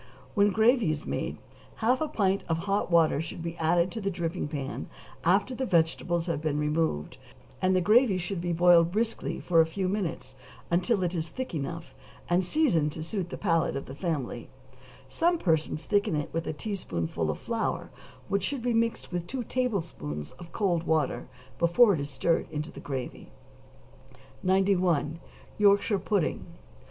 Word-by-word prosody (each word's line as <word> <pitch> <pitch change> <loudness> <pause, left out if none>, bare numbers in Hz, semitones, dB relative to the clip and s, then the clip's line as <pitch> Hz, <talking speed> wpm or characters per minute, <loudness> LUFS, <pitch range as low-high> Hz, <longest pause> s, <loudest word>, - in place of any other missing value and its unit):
When 205 -1 +4
gravy 220 0 +3
is 155 -1 -2
made, - - -3 0.4
half 245 +4 +1
a 315 - +1
pint 200 -9 +1
of 165 0 0
hot 200 0 0
water 165 -4 +4
should 160 +1 -6
be 170 0 -4
added 170 +2 +2
to 225 - -5
the 195 - 0
dripping 170 -3 -3
pan, 145 -3 -5 0.4
after 195 +8 +3
the 260 - -3
vegetables 170 -3 +1
have 170 -4 -2
been 155 -2 -1
removed, 150 - -1 0.4
and 185 0 +3
the 185 - +3
gravy 215 +2 +4
should 180 0 -3
be 175 0 -1
boiled 170 0 +5
briskly 225 +3 -1
for 165 -2 +4
a - - +4
few 185 +3 -2
minutes, 170 -9 -3 0.4
until 185 +4 +2
it 175 0 -1
is 165 -2 -2
thick 260 +6 -5
enough, 165 +2 -5 0.3
and 175 +2 +2
seasoned 175 - +2
to 160 - -5
suit 180 +1 -3
the - - -6
palate 165 -7 +1
of 140 - -4
the 135 - -8
family; 140 -7 -3 0.6
some 345 +1 +2
persons 160 - 0
thicken 205 -6 +1
it 150 -1 -3
with 165 0 -2
a - - 0
teaspoonful 85 - -3
of 75 - -1
flour, - - -2 0.4
which 200 0 0
should 250 +6 -3
be 245 -1 +1
mixed 230 -3 0
with 175 -1 -3
two 255 +4 -3
tablespoonfuls 170 - -3
of 170 -1 -11
cold 180 -5 +1
water 160 -4 0 0.3
before 200 +6 +5
it 165 - -1
is 140 0 -3
stirred 145 +5 0
into 150 0 -4
the - - -10
gravy. 135 -3 -6 1.1
91. 185 -5 +2 0.4
=Yorkshire 205 0 +4
Pudding. 195 -2 -1
175 Hz, 170 wpm, -28 LUFS, 160-200 Hz, 1.1 s, boiled